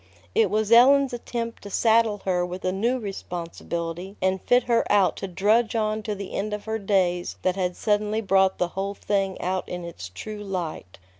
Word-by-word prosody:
It 450 0 +3
was 215 0 0
Ellen's 265 +3 +6
attempt 235 -1 -4
to 200 - -9
saddle 220 0 +2
her 180 -2 +1
with 180 +1 -5
a 185 - +2
new 230 +7 0
responsibility 175 -3 -5
and 190 0 0
fit 245 0 +3
her 235 -1 +2
out 200 -2 +4
to 195 - -4
drudge 215 +6 +2
on 215 -1 0
to 210 0 -3
the 200 -1 -7
end 210 +1 -2
of 210 - -10
her 220 0 -2
days 185 -3 0
that 185 -1 +1
had 180 -2 -1
suddenly 210 0 0
brought 190 -2 +3
the 180 - 0
whole 195 +2 -3
thing 195 -2 -1
out 185 +1 -2
in 180 -1 -5
its 95 - -8
true 210 - -7
light. 175 - -5
200 Hz, 195 wpm, -25 LUFS, 185-220 Hz, -, Ellen's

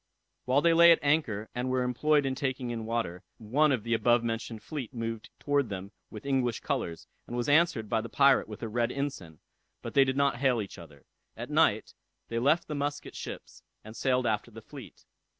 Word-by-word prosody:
While 130 +3 +2
they 170 -1 +5
lay 170 +1 +8
at 165 - +6
anchor, 145 -8 +1
and 125 +1 -2
were 130 0 +1
employed 145 +4 +2
in 135 - 0
taking 130 -2 -3
in 115 -2 -5
water, 115 -7 -2 0.2
one 140 +8 +2
of 125 -6 0
the 115 +1 -1
above 120 +1 +3
mentioned 115 -1 -4
fleet 140 -5 -6
moved 115 -1 -4
towards 145 -4 0
them 100 0 -6 0.2
with 105 +2 -10
English 130 -4 0
colors, 120 - -3 0.2
and 120 - -5
was 120 - -1
answered 145 -7 +3
by 110 +1 0
the 115 - -7
pirate 140 +2 +4
with 105 +1 -9
a - - -2
red 120 +2 0
ensign; 135 - -5 0.4
but - - -6
they 140 - +6
did 130 0 -1
not 140 -3 +2
hail 130 -2 +2
each 100 -2 -6
other. 75 -4 -14 0.3
At - - -6
night - - +2 0.4
they 115 - -1
left 145 +7 +2
the 150 - -4
Muscat 145 0 -4
ships, - - -8 0.2
and 110 +1 -11
sailed 130 0 +1
after 110 0 -1
the 110 -1 -12
fleet. - - -12
125 Hz, 205 wpm, -29 LUFS, 110-140 Hz, 0.4 s, lay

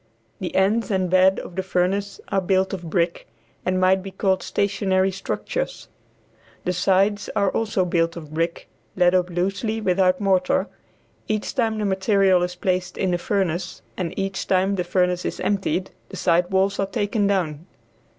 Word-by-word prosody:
The 185 - -4
ends 210 +5 +2
and 185 -3 0
bed 185 +1 +5
of 175 - -10
the 190 - 0
furnace 190 +2 -1
are 195 - +1
built 190 +1 +1
of 175 -3 -5
brick, 170 0 0 0.4
and 185 0 0
might 185 +1 +3
be 195 - -7
called 190 0 0
stationary 195 -1 +1
structures. 340 - -4 0.8
The 180 - +1
sides 195 +3 +2
are 200 -2 +2
also 210 -4 0
built 165 -1 +1
of 155 -2 -9
brick 165 +2 -2 0.3
laid 180 -1 +4
up 180 -1 +2
loosely 195 +5 -1
without 185 -2 +2
mortar; 190 -2 +2 0.6
each 215 -1 -2
time 225 -4 0
the 210 - -1
material 190 -1 +3
is 180 0 -2
placed 180 0 -1
in 190 - 0
the 175 - 0
furnace, 180 -2 -2
and 175 -3 -4
each 195 0 -2
time 190 +1 +2
the 185 -2 -1
furnace 180 0 +1
is - - -4
emptied, 190 -2 -1 0.2
the - - -8
side 175 0 +2
walls 195 +1 +1
are 195 - +1
taken 205 +1 0
down. 170 -5 -1
190 Hz, 170 wpm, -23 LUFS, 180-195 Hz, 0.8 s, bed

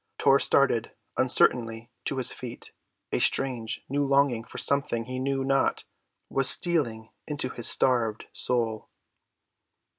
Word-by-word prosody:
Tor 135 0 +4
started 120 -5 +1 0.2
uncertainly 120 -2 +1
to 140 - -2
his 125 -1 +3
feet, 120 -2 -9 0.4
a - - 0
strange, 120 -5 -1
new 145 +2 -1
longing 140 -4 +2
for - - -11
something 130 -5 +1
he 130 +1 -5
knew 135 0 -1
not 135 0 0 0.4
what 135 -1 +1
stealing 120 -11 +1 0.2
into 145 -4 -2
his 120 -2 -1
starved 115 -4 +2
soul. 115 -3 -1
130 Hz, 125 wpm, -26 LUFS, 115-135 Hz, 0.4 s, Tor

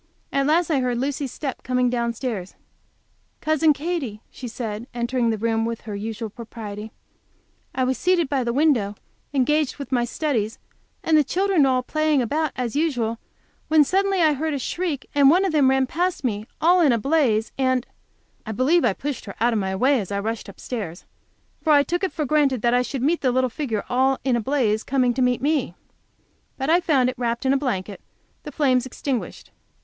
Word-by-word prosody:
At 275 0 +1
last 330 +2 +2
I 285 - +3
heard 250 -2 0
Lucy's 275 +1 -2
step 275 -4 -5
coming 250 0 +1
downstairs. 235 -5 -2 0.8
"Cousin 310 0 +3
Katy," 290 -8 -3
she 250 - -8
said, 225 -1 -5
entering 235 0 0
the 220 - 0
room 225 +1 0
with 230 0 -3
her 210 -2 -6
usual 220 +1 -5
propriety, 220 -2 -8 0.8
"I 260 - +1
was 255 0 0
seated 360 -3 +2
by 270 -2 0
the 235 - -1
window, 245 -7 +2 0.4
engaged 290 +2 +1
with 280 -1 -8
my 245 -2 +2
studies, 240 -5 -2 0.5
and 320 - +3
the 305 - +6
children 375 +3 +1
were 255 -1 +2
playing 310 +1 +1
about, 295 +5 0
as 245 -1 -3
usual, 245 -8 0 0.5
when 310 -1 +5
suddenly 385 +3 +1
I 310 -1 +4
heard 305 +1 -2
a - - -1
shriek, 315 +2 -3
and 280 -1 +6
one 365 +6 +4
of 380 - 0
them 290 -4 +4
ran 265 0 +3
past 350 +4 -1
me, 215 -3 -2
all 350 +2 +4
in 300 -5 +5
a 235 - +3
blaze 235 -4 +1
and 260 -1 +1 0.3
" - - -41
I 220 - -3
believe 290 +10 +3
I 220 - +3
pushed 280 +3 -5
her 200 - -8
out 235 +2 +2
of 220 - +1
my 190 -1 -2
way 260 +6 +3
as 200 -2 -5
I 200 - -1
rushed 220 0 -4
upstairs, 200 -4 -6 0.6
for 310 - +3
I 285 -1 +6
took 350 +6 -2
it 380 - 0
for 305 - -2
granted 275 -5 +1
I 245 +1 +4
should 255 0 -4
meet 330 +5 +1
the 255 - +2
little 255 0 +1
figure 230 -7 -3
all 265 +1 +2
in 260 -2 +2
a 235 - 0
blaze, 220 -4 +1
coming 255 -2 +1
to 260 - -2
meet 250 0 +1
me. 285 - 0 0.8
But 270 +3 0
I 345 - +5
found 285 -8 +2
it 255 -1 -7
wrapped 235 +1 -2
in 265 - +4
a - - +3
blanket, 205 -8 -3 0.4
the 295 - -8
flames 260 -3 +2
extinguished. 260 -1 -4
260 Hz, 200 wpm, -23 LUFS, 230-300 Hz, 0.8 s, the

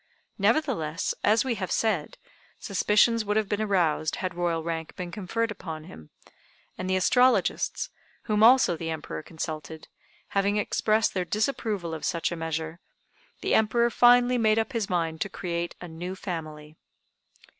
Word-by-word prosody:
Nevertheless, 200 - +1
as 220 +4 +3
we 260 - 0
have 185 - -2
said, 205 -9 0 0.4
suspicions 210 +3 +2
would 210 0 0
have 215 -2 +1
been 205 +2 -1
aroused 175 -7 +1
had 185 -2 -3
Royal 170 -2 -1
rank 165 -1 -4
been 180 -1 -6
conferred 220 +4 -2
upon 160 -6 -7
him, 80 - -13 0.7
and 185 - -4
the 185 - +2
astrologists, 245 +7 +2 0.3
whom 210 -2 0
also 235 -5 +6
the 165 0 -5
Emperor 160 -1 -5
consulted, 155 -1 -7 0.4
having 200 +1 +1
expressed 215 +1 +1
their 185 - 0
disapproval 210 -3 -2
of 160 - -6
such 170 0 -1
a - - -2
measure, 160 0 -4 0.6
the - - 0
Emperor 235 +2 +3
finally 245 +1 +5
made 220 -1 +3
up 225 +4 -1
his 225 -4 -1
mind 165 -3 -1
to 200 - -1
create 170 -2 -4
a 175 - -8
new 175 +3 -6
family. 155 -5 -6
185 Hz, 155 wpm, -27 LUFS, 165-220 Hz, 0.7 s, also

